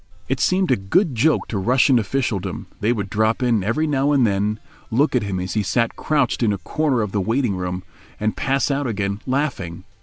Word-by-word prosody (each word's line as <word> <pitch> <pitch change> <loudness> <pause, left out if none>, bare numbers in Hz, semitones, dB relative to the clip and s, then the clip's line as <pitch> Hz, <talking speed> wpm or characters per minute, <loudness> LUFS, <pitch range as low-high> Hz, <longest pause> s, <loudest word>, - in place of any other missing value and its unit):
It - - -1
seemed 185 -3 +2
a - - +5
good 135 - +1
joke 145 +7 +2
to 105 - -2
Russian 125 +4 +4
officialdom; 110 -3 -2
they 110 +3 +1
would 105 -5 -2
drop 110 +4 +1
in 115 -5 +2
every 115 +10 0
now 145 -1 +1
and 135 -4 +4
then, 105 +1 0 0.3
look 135 +5 +2
at 125 - +3
him 100 -2 -3
as 90 -1 -4
he 110 - +1
sat 115 +3 0
crouched 145 -6 0
in 115 -3 +3
a 100 - -1
corner 130 - 0
of 105 - -4
the 100 - 0
waiting 115 +1 0
room, 90 0 -4 0.4
and 110 0 -1
pass 135 +1 0
out 140 0 -1
again, 100 -2 -2
laughing. 125 - -2
115 Hz, 210 wpm, -21 LUFS, 100-135 Hz, 0.4 s, a